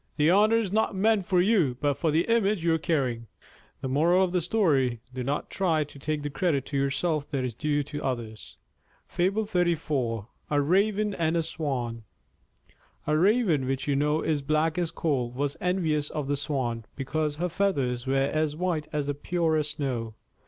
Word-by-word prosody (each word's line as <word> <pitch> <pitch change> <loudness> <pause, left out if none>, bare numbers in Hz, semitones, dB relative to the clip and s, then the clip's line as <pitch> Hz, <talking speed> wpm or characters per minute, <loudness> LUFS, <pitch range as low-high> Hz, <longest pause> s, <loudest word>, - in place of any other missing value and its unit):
"The 150 +2 +4
honor 210 +4 +5
is 215 -5 -1
not 215 -1 +1
meant 205 -1 +2
for 185 -2 +3
you 180 - +2
but 145 -1 +2
for 160 +4 -1
the 160 +3 +3
image 215 -5 +1
you 170 -1 +3
are 160 - +1
carrying." 130 -8 -1 0.6
Do 130 - -2 1.3
not 140 +4 -2
try 165 -5 +1
to 145 -1 -13
take 150 +1 -2
the 145 - -2
credit 150 -5 0
to 145 - -6
yourself 145 +2 0
that 135 -4 -1
is 125 - -3
due 145 +4 0
to 145 +1 -6
others. 115 -5 -5 0.6
A - - +4 1.4
RAVEN 200 +7 +2
AND 165 -2 0
A 165 - +1
SWAN 130 -8 -3 1.0
A 150 - +1
Raven, 180 - +3
which 135 0 -2
you 140 - +2
know 150 +2 +1
is 155 -3 0
black 155 +3 +1
as 170 -2 0
coal, 135 -9 -1
was 140 +3 -2
envious 160 -5 0
of 150 -3 -4
the 145 - +1
Swan, 130 -6 -2
because 150 +2 -2
her 175 +4 -1
feathers 140 -10 -1
were 135 - +1
as 150 +2 +1
white 165 -3 -1
as 150 -2 -1
the 145 - -1
purest 155 -1 0
snow. 120 -6 -3
150 Hz, 165 wpm, -27 LUFS, 140-175 Hz, 1.4 s, honor